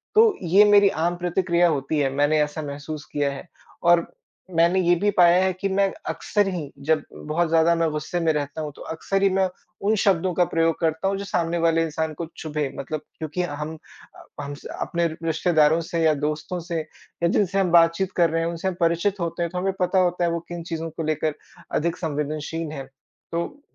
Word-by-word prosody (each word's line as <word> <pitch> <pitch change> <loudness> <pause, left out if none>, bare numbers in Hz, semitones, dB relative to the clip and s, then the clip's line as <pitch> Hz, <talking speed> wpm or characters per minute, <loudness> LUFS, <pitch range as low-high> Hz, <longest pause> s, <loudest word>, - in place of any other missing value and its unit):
तो 440 - +8 0.2
ये 185 +4 +6
मेरी 205 -1 +6
आम 170 0 -1
प्रतिक्रिया 175 0 +2
होती 150 0 -1
है, 140 -2 +2
मैंने 145 +2 +2
ऐसा 150 +1 -4
महसूस 145 +1 -6
किया 145 -1 0
है। 140 +5 -8 0.4
और 175 0 +6 0.6
मैंने 170 +3 +4
ये 175 0 +4
भी 200 +4 +1
पाया 175 +1 +6
है 190 - +2
कि 190 +2 -3
मैं 195 0 +2 0.2
अक्सर 205 -2 0
ही, 170 -7 -4
जब 155 +1 +1
बहुत 160 +2 -1
ज़्यादा 165 +1 +4
मैं 165 -1 +1
गुस्से 155 +3 -3
में 165 -1 +2
रहता 145 +1 -3
हूँ, 150 -1 -4
तो - - -13
अक्सर 195 +4 -2
ही 195 - +5
मैं 190 0 +2 0.3
उन 210 +2 +2
शब्दों 185 -2 +2
का 180 +1 +3
प्रयोग 165 -1 +1
करता 160 +2 0
हूँ 195 0 0
जो 200 - -5
सामने 170 -3 -1
वाले 165 -1 +2
इंसान 160 0 -2
को 165 +3 -5
चुभे, 150 -2 -3
मतलब 150 +2 -4 0.2
क्योंकि 160 +3 -3
हम 150 -1 -5 0.6
हम 145 0 -5
स 145 - -13 0.2
अपने 170 0 0 0.2
रिश्तेदारों 160 -1 +3
से 165 0 -3
या 160 -1 +5
दोस्तों 155 +4 -3
से 170 -1 -3
या 160 +2 -5
जिनसे 195 0 +1
हम 185 -3 +1
बातचीत 170 +2 +4
कर 170 -2 +4
रहे 165 +1 0
हैं, 165 - 0
उनसे 170 +2 -4
हम 190 - 0
परिचित 170 +4 +1
होते 170 0 -2
हैं 170 - -3
तो 180 - -5
हमें 190 +1 0
पता 185 +1 +2
होता 180 -1 +1
है 170 - +2
वो 170 - -1
किन 175 -1 -5
चीज़ों 165 -1 -4
को 160 +1 -5
लेकर, 155 -1 -1 0.4
अधिक 170 +2 0
संवेदनशील 155 +1 -3
हैं। 140 -3 -6 0.5
तो 170 +12 -4
165 Hz, 210 wpm, -24 LUFS, 155-180 Hz, 0.6 s, तो